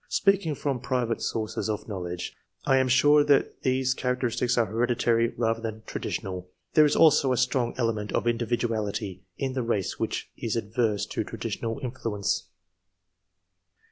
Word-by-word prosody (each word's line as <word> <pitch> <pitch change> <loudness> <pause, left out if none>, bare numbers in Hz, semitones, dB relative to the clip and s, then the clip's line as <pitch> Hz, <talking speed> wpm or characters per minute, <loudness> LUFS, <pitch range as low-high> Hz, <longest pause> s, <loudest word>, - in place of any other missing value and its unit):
Speaking 195 -6 +2
from 140 -2 -2
private 125 -2 -1
sources 110 0 -2
of 105 - -3
knowledge, 90 -4 -5 0.3
I 135 - +4
am 130 0 +3
sure 145 +4 +5
that 140 -2 +2
these 130 0 +1
cha 125 -1 -1
racteristics 125 0 0
are 115 - +4
hereditary 115 +1 +2
rather 115 -1 0
than 110 -1 -5
traditional; 90 -1 -4 0.2
there 155 - +7
is 145 - +2
also 145 -4 +5
a 125 - +1
strong 125 -1 +1
element 110 -4 -1
of - - 0
individuality 115 -4 -1 0.2
in 135 -1 -2
the 130 - -1
race 115 -5 -1
which - - -3
is 115 - -3
adverse 110 -1 0
to - - -3
traditional 115 +3 -4
influence. 105 -6 -2
120 Hz, 150 wpm, -27 LUFS, 110-130 Hz, 0.3 s, there